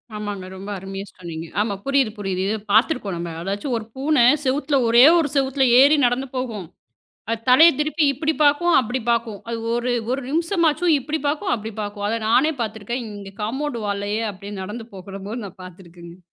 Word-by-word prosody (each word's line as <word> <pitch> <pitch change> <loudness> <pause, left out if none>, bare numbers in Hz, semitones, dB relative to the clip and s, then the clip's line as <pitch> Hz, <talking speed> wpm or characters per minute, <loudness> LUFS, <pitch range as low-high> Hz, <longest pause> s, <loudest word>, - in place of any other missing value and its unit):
ஆமாங்க. 205 -3 -5
ரொம்ப 195 +2 -8
அருமையா 195 +1 -7
சொன்னீங்க. 165 -3 -7 0.2
ஆமா, 210 -1 -1
புரியுது 275 -5 +2
புரியுது. 195 -2 -3
இது 215 +2 0
பாத்திருக்கோம் 220 - +2
நம்ம. 170 0 -5
அதாச்சு 200 +7 -4
ஒரு 220 - -6
பூனை 275 -1 +2 0.2
செவுத்துல 280 +2 +1
ஒரே 235 +2 +6 0.2
ஒரு 305 -3 0
செவுத்துல 270 0 +2
ஏறி 285 +3 +6
நடந்து 250 +3 0
போகும். 230 -8 -4 0.7
அது 230 -1 -1
தலைய 315 +7 +8
திருப்பி 305 +1 +1
இப்படி 305 +4 -1
பார்க்கும் 310 +4 +3
அப்படி 250 +2 -3
பார்க்கும். 230 -3 -1
அது 230 -1 -3 0.2
ஒரு 240 +1 -1 0.2
ஒரு 260 +2 0
நிமிஷமாச்சும் 335 0 +1
இப்படி 300 +4 -3
பார்க்கும், 310 +7 -1
அப்படி 220 -1 -6
பார்க்கும். 205 0 -4
அத 230 +1 -1
நானே 275 +8 +4
பாத்திருக்கேன். 220 +3 -4
இங்க 200 -1 -10
காம்பவுண்ட் 265 +4 -3
வால்லயே 205 +2 -2
அப்படியே 200 +1 -9
நடந்து 220 +4 -7
போகிறம்போது 195 +4 -7
நான் 190 -1 -11
பாத்திருக்கங்க. 175 -1 -13
230 Hz, 170 wpm, -22 LUFS, 200-275 Hz, 0.7 s, தலைய